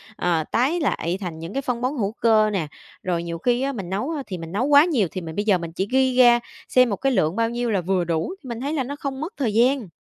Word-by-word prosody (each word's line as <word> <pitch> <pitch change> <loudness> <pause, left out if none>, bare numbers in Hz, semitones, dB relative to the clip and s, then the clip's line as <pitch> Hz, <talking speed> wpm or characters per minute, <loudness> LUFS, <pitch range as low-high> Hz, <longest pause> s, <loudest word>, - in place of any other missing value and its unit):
ờ, 170 -5 0
tái 275 +9 +1
lại 180 - -1
thành 170 -4 -5
những 165 +4 -7
cái 275 - -1
phân 250 -3 -3
bón 260 +4 -1
hữu 205 -3 -1
cơ 220 -2 +3
nè. 185 -7 -2 0.4
Rồi 175 -2 -1
nhiều 170 -1 -4
khi 245 +7 +1
á, 275 - 0
mình 195 -9 -6
nấu 210 - -2 0.2
thì 185 -3 -5
mình 165 -1 -8
nấu 210 +7 0
quá 290 +1 +6
nhiều, 260 - +1
thì 185 - -5
mình 160 -2 -7
bây 205 - -1
giờ 205 -4 +4
mình 170 -1 -6
chỉ 190 +4 -2
ghi 260 -1 +2
ra 240 -1 +7 0.3
xem 255 -1 +4
một 205 - 0
cái 270 +6 0
lượng 160 -7 +1
bao 230 +1 +1
nhiêu 240 0 -2
là 195 -3 +1
vừa 185 +1 0
đủ, 165 - -2
thì - - -10
mình 235 +1 -5
thấy 285 +3 -2
là 280 - 0
nó 280 +3 -5
không 275 -1 -5
mất 335 +7 -5
thời 240 -7 -1
gian. 245 0 +2
225 Hz, 290 wpm, -23 LUFS, 180-260 Hz, 0.4 s, ra